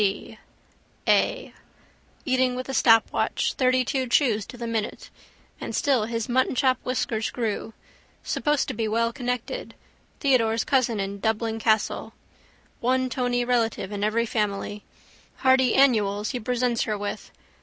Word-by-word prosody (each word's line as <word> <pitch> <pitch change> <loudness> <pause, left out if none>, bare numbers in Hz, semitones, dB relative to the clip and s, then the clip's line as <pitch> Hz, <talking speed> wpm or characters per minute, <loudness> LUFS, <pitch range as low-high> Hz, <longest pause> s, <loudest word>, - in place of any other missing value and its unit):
C. 210 +2 -2 0.7
A. - - +2 0.7
Eating 255 -2 +2
with 255 +1 -5
a 270 - -4
stopwatch, 225 -4 +3
thirtytwo 255 0 +1
chews 225 -7 +2
to 245 - -10
the 235 - -5
minute. 225 -2 -4 0.5
And - - -5
still 265 -8 +2
his 230 -1 -3
muttonchop 255 +1 +2
whiskers 230 -3 -1
grew. 225 -2 -3 0.5
Supposed 295 -1 0
to - - -2
be 225 -1 -2
well 230 +2 0
connected. 250 - -4 0.4
Theodore's 230 -5 +2
cousin 245 -5 +1
in 200 +1 -3
Dublin 220 +1 -1
Castle. 220 -1 0 0.7
One 255 +1 +1
tony 245 -1 0
relative 230 -5 0
in 205 -1 -3
every 225 +2 +1
family. 210 -2 -2 0.5
Hardy 260 -2 +3
annuals 210 -6 +3
he 250 - -3
presents 245 0 0
her 215 -1 -2
with. 205 0 -5
235 Hz, 135 wpm, -25 LUFS, 220-255 Hz, 0.7 s, stopwatch